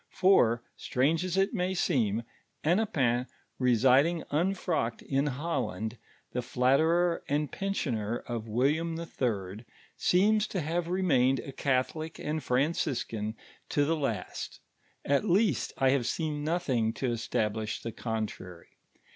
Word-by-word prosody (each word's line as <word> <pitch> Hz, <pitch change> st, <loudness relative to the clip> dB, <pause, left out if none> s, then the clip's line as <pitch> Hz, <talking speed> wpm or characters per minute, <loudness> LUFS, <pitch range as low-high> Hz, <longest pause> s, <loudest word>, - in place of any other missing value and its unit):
For, 120 Hz, -12 st, +4 dB
strange 155 Hz, +7 st, +1 dB
ns 185 Hz, 0 st, -2 dB
it 195 Hz, +3 st, +2 dB
may 185 Hz, -2 st, 0 dB
seem, 120 Hz, -, +1 dB, 0.4 s
Hennepin 145 Hz, -, +2 dB, 0.3 s
residing 130 Hz, +7 st, +4 dB
unfrocked 165 Hz, -7 st, 0 dB
in 140 Hz, +1 st, 0 dB
Holland, 125 Hz, -, -3 dB, 0.3 s
the 125 Hz, -, -1 dB
flatterer 160 Hz, +8 st, +2 dB
and 145 Hz, 0 st, 0 dB
pen 195 Hz, 0 st, -2 dB
sioner 115 Hz, -, -2 dB
of 115 Hz, -2 st, -4 dB
William 150 Hz, +9 st, +1 dB
IH., 110 Hz, -, -3 dB, 0.3 s
seems 210 Hz, +4 st, +3 dB
to 185 Hz, -, -2 dB
have 165 Hz, +3 st, -1 dB
remained 150 Hz, -8 st, +2 dB
n 140 Hz, -, -7 dB
Catholic 140 Hz, +4 st, -1 dB
and 155 Hz, 0 st, -3 dB
Franciscan 125 Hz, -5 st, -1 dB, 0.3 s
to 145 Hz, -, +2 dB
the 165 Hz, +3 st, +1 dB
Inst; 130 Hz, -, -4 dB, 0.5 s
ot 140 Hz, +5 st, +3 dB
least 195 Hz, -, +2 dB
I 135 Hz, -1 st, +4 dB
have 130 Hz, -4 st, +1 dB
seen 150 Hz, -3 st, -2 dB
nothing 130 Hz, -9 st, 0 dB
to 125 Hz, +1 st, -1 dB
establish 110 Hz, -2 st, -1 dB
the 115 Hz, -, -5 dB
contrary. 110 Hz, -7 st, -5 dB
140 Hz, 125 wpm, -29 LUFS, 120-170 Hz, 0.5 s, For